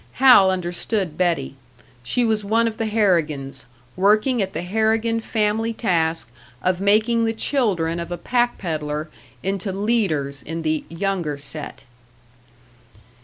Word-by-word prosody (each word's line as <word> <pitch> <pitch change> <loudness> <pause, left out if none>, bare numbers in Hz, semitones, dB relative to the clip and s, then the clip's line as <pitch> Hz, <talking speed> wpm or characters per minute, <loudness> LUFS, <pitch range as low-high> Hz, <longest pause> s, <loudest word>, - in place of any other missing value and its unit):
Hal 250 -7 +7
understood 180 0 -2
Betty 165 -7 0 0.5
she 235 - 0
was 220 -2 0
one 225 +3 +2
of 220 -1 -4
the 225 - -1
Harrigans, 150 - 0 0.3
working 215 +6 +3
at 190 -1 -2
the 165 - -3
Harrigan 220 +4 +1
family 220 0 0
task 165 - 0 0.3
of 185 0 +1
making 220 +3 +3
the 225 - 0
children 195 - 0
of 170 - -5
a 175 - -3
pack 240 +3 0
pedlar 155 -3 -3 0.3
into 195 +1 -1
leaders 185 - 0
in 165 +3 -5
the 155 -1 -1
"younger 170 -3 -2
set!" 145 +1 -8
190 Hz, 130 wpm, -22 LUFS, 160-220 Hz, 0.5 s, Hal